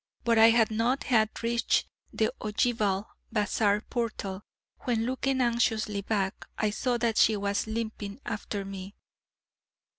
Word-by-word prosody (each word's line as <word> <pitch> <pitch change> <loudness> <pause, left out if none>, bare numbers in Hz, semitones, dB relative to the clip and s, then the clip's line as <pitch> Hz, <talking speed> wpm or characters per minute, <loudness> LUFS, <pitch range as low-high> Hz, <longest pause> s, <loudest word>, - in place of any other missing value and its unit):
But 230 -1 +3
I 225 +1 +9
had 225 -1 +4
not 235 +5 +1
half 220 -4 +3
reached 235 +1 +1 0.3
the - - 0
ogival 210 -2 0 0.3
bazaar 210 -1 +2
portal, 215 -6 -3 0.4
when 230 -2 0
looking 260 +1 0
anxiously 225 -4 +1
back, 195 -2 -2
I 215 -1 +1
saw 245 +3 0
that 230 -2 0
she 215 -1 +5
was 200 +1 -1
limping 220 -1 -4
after 205 -2 -4
me. 195 0 -8
220 Hz, 130 wpm, -28 LUFS, 205-235 Hz, 0.4 s, I